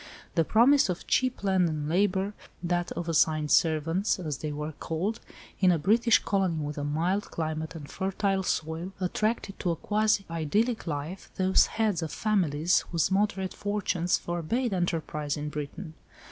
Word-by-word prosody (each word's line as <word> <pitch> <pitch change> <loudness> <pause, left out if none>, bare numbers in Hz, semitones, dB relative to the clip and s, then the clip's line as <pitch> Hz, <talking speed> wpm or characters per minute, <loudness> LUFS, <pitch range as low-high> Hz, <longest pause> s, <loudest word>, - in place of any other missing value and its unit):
The 165 - +3
promise 240 - +4
of 180 - -3
cheap 255 -4 +1
land 190 -3 +3
and 150 -2 -3
labour 190 +3 +1 0.3
(that 175 0 -1
of 170 +1 -4
assigned 155 -2 +2
servants, 165 +5 +2
as 155 -7 -4
they 155 - -3
were 150 +1 -4
called) 165 +8 -3 0.4
in 185 -2 +5
a 170 - +3
British 225 +8 +4
colony 195 -4 0
with 150 -1 -4
a - - -3
mild 170 +7 -1
climate 160 0 -3
and 150 -3 -8
fertile 195 +2 -1
soil, 165 +1 -2
attracted 205 +2 -1
to 180 - -1
a 170 - +1
quasi 210 +1 +1
idyllic 195 +9 0
life 155 +5 -5
those 190 0 +4
heads 215 -6 0
of 160 -2 -4
families, 175 -6 +2
whose 170 +1 +1
moderate 195 -1 0
fortunes 195 -4 0
forbade 195 +8 -2
enterprise 160 -5 -2
in 150 0 -3
Britain. 150 +3 -6
175 Hz, 160 wpm, -28 LUFS, 155-200 Hz, 0.4 s, in